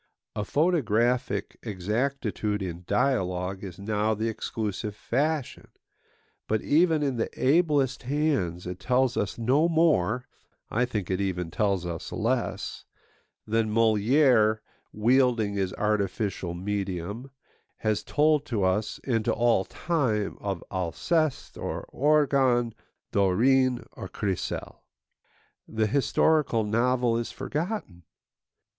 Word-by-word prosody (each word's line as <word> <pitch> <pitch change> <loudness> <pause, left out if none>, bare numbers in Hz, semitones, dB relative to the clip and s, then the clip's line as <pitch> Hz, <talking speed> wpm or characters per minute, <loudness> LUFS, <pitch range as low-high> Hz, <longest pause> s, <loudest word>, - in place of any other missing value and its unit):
A 105 - -1
photographic 125 - +1
exactitude 105 0 -2
in 90 -1 -6
dialogue 95 -5 0
is 95 -3 -7
now 105 +2 0
the 110 +2 -1
exclusive 105 -1 -4
fashion; 145 +4 -2 0.8
but 110 - +1
even 160 0 +3
in 135 -4 -1
the 115 - -1
ablest 140 -2 +2
hands 130 - -1
it 90 +1 -5
tells 130 0 +1
us 100 - -2
no 135 +8 +2
more—I 125 - 0
think 105 -7 -3
it 95 +1 0
even 90 -3 -2
tells 100 -2 0
us 85 -1 -5
less—than 110 0 -3
Molière, 110 0 +4 0.3
wielding 120 -1 +2
his 95 -2 -1
artificial 100 -3 -1
medium, 100 +4 -4 0.5
has 110 -1 0
told 150 0 +2
to 110 -6 -1
us 95 +4 0
and 115 -4 0
to - - +2
all 115 -5 +2
time 125 -12 -1
of 100 -4 -4
Alceste 135 - -1
or - - -4
Orgon, 135 -5 +3 0.4
Dorine 125 +6 +3
or - - -8
Chrysale. 95 -3 -4 0.9
The 110 -1 0
historical 140 0 +2
novel 120 +2 +1
is 120 - -4
forgotten. 155 - -4
115 Hz, 110 wpm, -27 LUFS, 100-135 Hz, 0.9 s, Molière